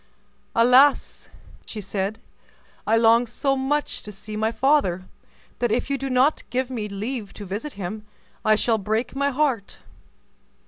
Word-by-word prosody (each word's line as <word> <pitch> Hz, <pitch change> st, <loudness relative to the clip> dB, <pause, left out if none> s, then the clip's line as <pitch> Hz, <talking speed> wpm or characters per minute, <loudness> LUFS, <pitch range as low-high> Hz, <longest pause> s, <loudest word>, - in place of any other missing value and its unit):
"Alas!" 255 Hz, +5 st, +4 dB, 0.4 s
she 220 Hz, -, -6 dB
said, 200 Hz, +1 st, -3 dB, 0.7 s
"I 225 Hz, +1 st, +4 dB
long 230 Hz, +1 st, +4 dB
so 275 Hz, +4 st, 0 dB
much 280 Hz, +3 st, -1 dB
to 210 Hz, -, -7 dB
see 210 Hz, +2 st, -9 dB
my 220 Hz, +1 st, 0 dB
father, 245 Hz, -10 st, +2 dB, 0.6 s
that 240 Hz, -2 st, +1 dB
if 245 Hz, +4 st, -1 dB
you 275 Hz, -, +1 dB
do 270 Hz, -, -3 dB
not 260 Hz, +4 st, +3 dB
give 255 Hz, +1 st, -2 dB
me 215 Hz, -4 st, -4 dB
leave 210 Hz, +2 st, -5 dB
to 205 Hz, -, -8 dB
visit 210 Hz, +10 st, -5 dB
him, 210 Hz, +2 st, -6 dB, 0.4 s
I 215 Hz, 0 st, +4 dB
shall 220 Hz, +1 st, +1 dB
break 220 Hz, +5 st, -2 dB
my 280 Hz, +1 st, +1 dB
heart." 265 Hz, -7 st, -1 dB
230 Hz, 150 wpm, -23 LUFS, 210-265 Hz, 0.7 s, Alas